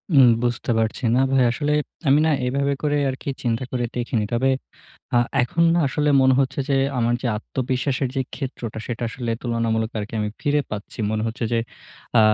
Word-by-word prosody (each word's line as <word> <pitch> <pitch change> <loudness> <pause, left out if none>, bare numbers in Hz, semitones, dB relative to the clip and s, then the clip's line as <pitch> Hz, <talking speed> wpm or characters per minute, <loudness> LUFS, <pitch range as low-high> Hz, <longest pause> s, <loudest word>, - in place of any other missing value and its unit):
উম 135 -2 +8 0.2
বুঝতে 120 0 -1
পারছি। 110 +4 -1
না 130 - +4
ভাই, 135 -1 +4
আসলে 145 +4 -1 0.4
আমি 140 +2 +6
না - - +3 0.2
এভাবে 140 +2 +1
করে 145 -1 +2
আরকি 130 +2 -5
চিন্তা 115 0 0
করে 120 -1 0
দেখিনি। 120 -3 -1
তবে 130 +3 +2 0.7
আ - - +6 0.2
এখন 160 +7 0
না - - +3
আসলে 150 +2 0
মনে 130 0 +5
হচ্ছে 135 +1 0
যে, 140 - +2 0.2
আমার 120 0 +2
যে - - -1
আত্মবিশ্বাসের 130 +3 -1
যে - - +2
ক্ষেত্রটা, 125 -5 -5
সেটা 120 0 -4
আসলে 120 0 -4
তুলনামূলক 115 -2 0
আরকি 105 +2 -5
আমি 105 0 -1
ফিরে 145 0 +2
পাচ্ছি। 105 +1 -7
মনে 110 0 -1
হচ্ছে 115 +2 -3
যে, 115 - +3 0.6
আ - - +8
125 Hz, 185 wpm, -23 LUFS, 115-135 Hz, 0.7 s, উম